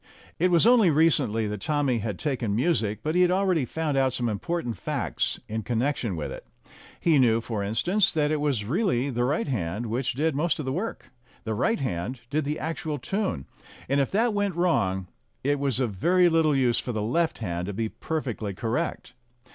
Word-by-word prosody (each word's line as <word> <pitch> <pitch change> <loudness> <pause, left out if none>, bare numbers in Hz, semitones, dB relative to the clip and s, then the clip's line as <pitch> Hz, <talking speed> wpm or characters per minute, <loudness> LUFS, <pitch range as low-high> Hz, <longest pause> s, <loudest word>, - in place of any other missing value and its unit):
It 180 +3 +3
was 170 +1 +4
only 235 -6 +6
recently 145 -8 +2
that 105 -1 -4
Tommy 145 -5 +1
had 105 -3 -3
"taken 120 -8 -1
music," 115 -6 0
but 155 - -1
he 180 - +3
had 180 - +5
already 185 -6 +2
found 155 +1 -2
out 130 -2 +2
some 120 -2 -1
important 120 - -3
facts - - -2
in 110 +1 -3
connection 120 -2 -1
with 80 - -4
it. - - -8 0.6
He 160 -4 +3
knew, 115 -3 +4
for 115 -2 -4
instance, 175 - +2
that 150 -2 +1
it 155 -1 0
was 135 -8 0
really 140 - 0
the 120 0 0
right 145 +5 0
hand 105 -3 -2
which 120 +2 -2
did 155 +3 +1
most 160 +3 +1
of 150 - -4
the 130 - -1
work; 205 - -4 0.3
the 110 - -2
right 225 - +1
hand 120 +1 -3
did 150 0 0
the 150 +2 -2
actual 160 -1 -3
tune, 190 - -2 0.4
and 140 +2 +2
if 135 - 0
that 225 +3 +2
went 205 -3 0
wrong 95 - +1 0.4
it 145 +1 +1
was 135 -3 0
of 125 -4 0
very 175 - +4
little 160 -3 +3
use 125 -3 +2
for 125 - -4
the 105 -1 -2
left 160 +9 0
hand 90 -4 -3
to 100 - -3
be 110 +3 -1
perfectly 115 -8 -4
correct. 120 +3 -3
135 Hz, 200 wpm, -26 LUFS, 115-160 Hz, 0.6 s, only